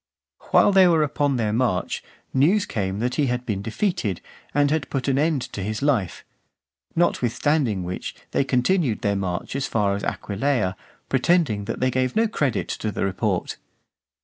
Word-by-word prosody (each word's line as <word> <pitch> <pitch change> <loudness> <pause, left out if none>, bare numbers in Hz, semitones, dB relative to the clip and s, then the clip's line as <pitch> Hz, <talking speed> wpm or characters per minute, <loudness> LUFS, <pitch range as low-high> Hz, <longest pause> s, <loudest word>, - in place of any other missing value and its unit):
While - - +5
they 190 -2 +6
were 165 -3 +4
upon 145 -1 0
their 110 -3 0
march, 115 -6 0 0.3
news 170 +10 +3
came 95 -2 -2
that 125 +1 0
he 140 - +2
had 125 0 -2
been 100 -4 -2
defeated, 110 - -1 0.3
and 145 0 +2
had 155 -3 -1
put 135 -1 -2
an 135 0 +2
end 150 -4 +1
to 100 - -4
his 105 +5 -3
life; 115 - 0 0.7
notwithstanding 130 - +1
which 90 +1 -5 0.2
they - - +2
continued 130 - +1
their 100 -1 +1
march 95 +3 -3
as 140 - -1
far 105 -3 +1
as 100 - -5
Aquileia, 105 -2 -1 0.3
pretending 130 - +2
that - - -4
they 130 0 +2
gave 130 0 0
no 225 +1 +3
credit 145 - -1
to 110 - -3
the - - -1
report. 95 -1 -1
125 Hz, 170 wpm, -23 LUFS, 105-145 Hz, 0.7 s, they